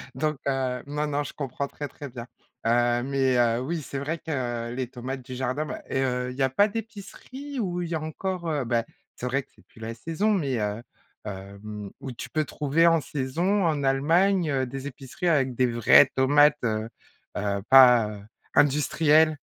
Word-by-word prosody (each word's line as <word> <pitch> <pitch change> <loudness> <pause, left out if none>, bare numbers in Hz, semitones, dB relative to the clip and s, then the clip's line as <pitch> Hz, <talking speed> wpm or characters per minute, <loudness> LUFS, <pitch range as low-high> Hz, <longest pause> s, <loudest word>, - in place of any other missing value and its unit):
Donc 150 0 -1
heu, 130 -2 -1
non 150 +1 -2
non, 145 0 -1
je - - -7
comprends 140 0 -4
très, 145 +1 -6
très 140 0 -9
bien. 120 -1 -8 0.4
Heu, 120 +1 +2
mais 135 -2 +1
heu, 120 -1 +3
oui, 160 +4 -3
c'est 135 +1 -5
vrai 160 +4 -3
que 120 -7 -3
les 125 0 -3
tomates 130 +1 -6
du 130 0 -8
jardin, 130 +4 -2
bah - - -6
et 135 - 0
heu, 125 -1 -1
il - - -9
y - - -3
a 130 - +3
pas 200 +11 +3
d'épicerie 230 +6 -7
où 180 -4 -2
il 170 - -5
y 170 - -3
a 155 - -2
encore, 170 +2 -4
heu, 145 -5 -1
bah, 115 -1 +1 0.3
c'est 125 - -5
vrai 135 +2 0
que - - -35
c'est - - -22
plus - - -19
la 115 +1 -5
saison, 165 - -1
mais 140 - 0
heu, 105 +2 -2 0.4
hem, 100 +1 -8
où 135 -1 -6
tu 120 - -8
peux 155 -1 0
trouver 155 +4 +2
en 165 -1 +5
saison 165 +9 -1
en 150 -4 0
Allemagne, 165 +7 +2
heu, 135 -2 0
des 135 +2 -6
épiceries 135 +5 -5
avec 135 -5 +2
des 125 +1 +2
vraies 120 +3 +6
tomates, 145 +3 +5
heu, 110 -1 -1 0.5
heu, 100 -1 -1
pas, 125 -5 +8
heu, 105 -1 -8 0.3
industrielles? 150 +2 +4
135 Hz, 200 wpm, -26 LUFS, 125-155 Hz, 0.5 s, pas